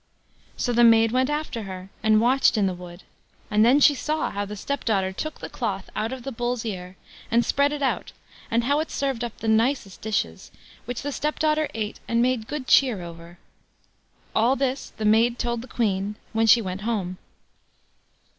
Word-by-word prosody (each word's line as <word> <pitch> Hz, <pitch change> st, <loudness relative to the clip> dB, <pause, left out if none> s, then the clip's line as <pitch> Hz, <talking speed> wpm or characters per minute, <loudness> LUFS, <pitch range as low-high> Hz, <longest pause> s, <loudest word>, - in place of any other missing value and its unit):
So 245 Hz, -, 0 dB
the 240 Hz, +1 st, +4 dB
maid 225 Hz, -1 st, +6 dB
went 255 Hz, +2 st, +2 dB
after 295 Hz, -6 st, -2 dB
her, 190 Hz, -1 st, -8 dB
and 215 Hz, 0 st, +4 dB
watched 245 Hz, +1 st, +3 dB
in 205 Hz, -, +3 dB
the 190 Hz, -, 0 dB
wood, 175 Hz, 0 st, -11 dB, 0.5 s
and 210 Hz, +1 st, +4 dB
then 250 Hz, +5 st, +5 dB
she 290 Hz, +1 st, +6 dB
saw 305 Hz, +3 st, -2 dB
how 205 Hz, 0 st, -3 dB
the 210 Hz, +1 st, -7 dB
stepdaughter 210 Hz, -5 st, -1 dB
took 310 Hz, +10 st, -5 dB
the -, -, -6 dB
cloth 200 Hz, -6 st, -4 dB
out 220 Hz, +2 st, -1 dB
of 260 Hz, -2 st, -6 dB
the 270 Hz, -, -4 dB
Bull's 240 Hz, 0 st, -2 dB
ear, 185 Hz, -3 st, -6 dB, 0.3 s
and 235 Hz, +1 st, +3 dB
spread 280 Hz, +1 st, +2 dB
it 295 Hz, -1 st, -3 dB
out, 265 Hz, -, -1 dB, 0.4 s
and 230 Hz, +1 st, +1 dB
how 285 Hz, +4 st, +2 dB
it 315 Hz, -, -2 dB
served 270 Hz, -4 st, -2 dB
up 235 Hz, -2 st, -5 dB
the 225 Hz, -, -5 dB
nicest 220 Hz, -2 st, +1 dB
dishes, 195 Hz, -, -2 dB, 0.4 s
which 245 Hz, +2 st, -5 dB
the 290 Hz, -, -2 dB
stepdaughter 305 Hz, +1 st, 0 dB
ate 215 Hz, -1 st, -3 dB
and 230 Hz, -, +1 dB
made 240 Hz, -2 st, +1 dB
good 295 Hz, -3 st, -4 dB
cheer 250 Hz, -9 st, +4 dB
over. 170 Hz, 0 st, -11 dB, 1.0 s
All 235 Hz, +4 st, +3 dB
this 270 Hz, 0 st, -2 dB
the 215 Hz, -, -3 dB
maid 230 Hz, +3 st, +4 dB
told 235 Hz, -1 st, -2 dB
the 250 Hz, -, -10 dB
Queen 205 Hz, -4 st, -1 dB, 0.2 s
when 225 Hz, 0 st, +2 dB
she 230 Hz, +1 st, +6 dB
went 185 Hz, 0 st, -4 dB
home. 200 Hz, -5 st, -2 dB
230 Hz, 190 wpm, -24 LUFS, 205-260 Hz, 1.0 s, maid